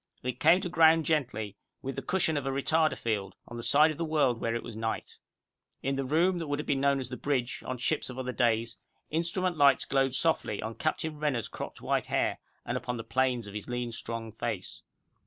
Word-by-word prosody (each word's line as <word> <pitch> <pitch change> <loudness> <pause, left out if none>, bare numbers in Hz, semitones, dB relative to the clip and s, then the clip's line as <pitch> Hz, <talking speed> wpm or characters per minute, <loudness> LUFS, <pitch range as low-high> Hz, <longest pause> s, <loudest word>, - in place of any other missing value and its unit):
It 125 -1 -3
came 170 +4 +6
to 185 - -2
ground 165 -1 +5
gently, 115 -10 -1 0.3
with 135 0 -3
the - - -3
cushion 175 -4 +1
of 140 -2 -1
a - - +1
retarder 155 +3 +2
field, 100 -5 -2
on 120 - -8
the 120 - -4
side 145 +7 +5
of 155 - -8
the - - 0
world 145 -7 +2
where 115 0 0
it 115 - -3
was 115 - -8
night. 110 0 -4 0.6
In 135 0 0
the 135 - -1
room 170 +7 +2
that 165 - -4
would 145 0 -1
have 150 - -4
been 135 -2 +1
known 140 0 +3
as 130 -2 -5
the 125 - -5
bridge 130 -2 -1
on 130 - -2
ships 145 +5 0
of 125 - -7
other 130 -1 -2
days, 115 -2 +1 0.3
instrument 170 +2 0
lights 140 -2 +5
glowed 135 -1 +1
softly 160 -8 +1
on 110 +1 -4
Captain 155 +2 -2
Renner's 140 -7 0
cropped - - -7
white - - 0
hair, - - 0 0.3
and - - -1
upon 125 0 -3
the 115 - -5
planes 130 -2 +1
of 100 - -9
his 105 +2 -6
lean, 120 -1 -2
strong 115 0 -5
face. - - -4
135 Hz, 225 wpm, -30 LUFS, 120-155 Hz, 0.6 s, came